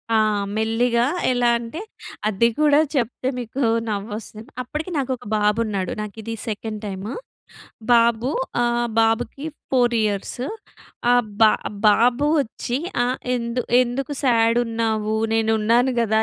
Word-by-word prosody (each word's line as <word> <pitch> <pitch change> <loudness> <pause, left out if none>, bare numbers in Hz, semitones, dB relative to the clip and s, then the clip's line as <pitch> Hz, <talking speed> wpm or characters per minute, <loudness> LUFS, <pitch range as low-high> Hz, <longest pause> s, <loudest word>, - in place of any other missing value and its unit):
ఆ! - - +5 0.4
మెల్లిగా 235 +2 +1 0.3
ఎలా 245 -1 +2
అంటే 235 - -6 0.5
అది 215 +2 +3
కూడా 295 -1 +5 0.2
చెప్తే 250 0 -1
మీకు 245 +3 -5 0.3
నవ్వొస్తది. 215 +1 -5 0.2
అప్పటికి 300 +8 -5
నాకు 270 -2 -1
ఒక 245 - -16
బాబు 210 +1 +2
ఉన్నాడు. 195 -4 -2
నాకు 210 0 -6
ఇది 230 +1 -5
సెకండ్ 215 0 -4
టైము. 200 +3 -5 0.8
బాబు 235 +1 +3 0.3
ఆహ్, 240 0 +1
బాబుకి 225 +6 0 0.3
4 245 -2 +3
ఇ‌యర్స్. 205 +3 -2 0.7
ఆహ్, 245 -1 +4 0.2
బా 215 - +7 0.4
బాబు 240 +6 +3
వచ్చి 245 0 -3 0.3
ఆహ్, 250 +1 0 0.2
"ఎందు 235 +1 -2 0.2
ఎందుకు 255 +3 -3
సాడు 230 -2 +3
ఉన్నావు? 220 -1 -1 0.2
నేను 225 0 +2
ఉన్నాను 240 +4 +3
కదా!" 220 -1 +2
230 Hz, 130 wpm, -22 LUFS, 220-245 Hz, 0.8 s, బా